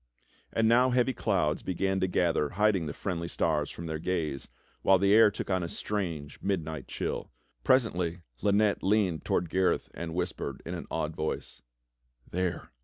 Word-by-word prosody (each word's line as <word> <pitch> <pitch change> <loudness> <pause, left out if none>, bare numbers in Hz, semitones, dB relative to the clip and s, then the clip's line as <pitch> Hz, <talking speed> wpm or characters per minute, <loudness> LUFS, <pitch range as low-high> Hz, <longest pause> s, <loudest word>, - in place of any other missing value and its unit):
And 115 0 +2
now 125 +3 +5
heavy 125 +1 +2
clouds 75 -8 0
began 95 +1 -1
to 95 - +1
gather 85 -4 +1
hiding 105 -6 +3
the - - -3
friendly 85 -4 -3
stars 75 -3 0
from 85 - -7
their 80 -1 -3
gaze, 80 -6 -2 0.3
while 95 - +5
the 100 +2 +3
air 110 0 +8
took 100 - -5
on 95 -1 +2
a 85 - -2
strange, 85 -8 -4
midnight 80 -7 -2
chill. - - -3 0.3
Pres 130 -2 +5
ently 85 -2 -3 0.2
Lynette 100 0 +3
leaned 95 -5 +2
toward 85 - +1
Gareth 95 0 +1
and 85 -1 -5
whispered 90 -2 -3
in - - -4
an - - -6
awed 75 +1 -2
voice: 75 -5 -4 0.7
"There!" 90 -4 -2
90 Hz, 170 wpm, -29 LUFS, 80-100 Hz, 0.7 s, air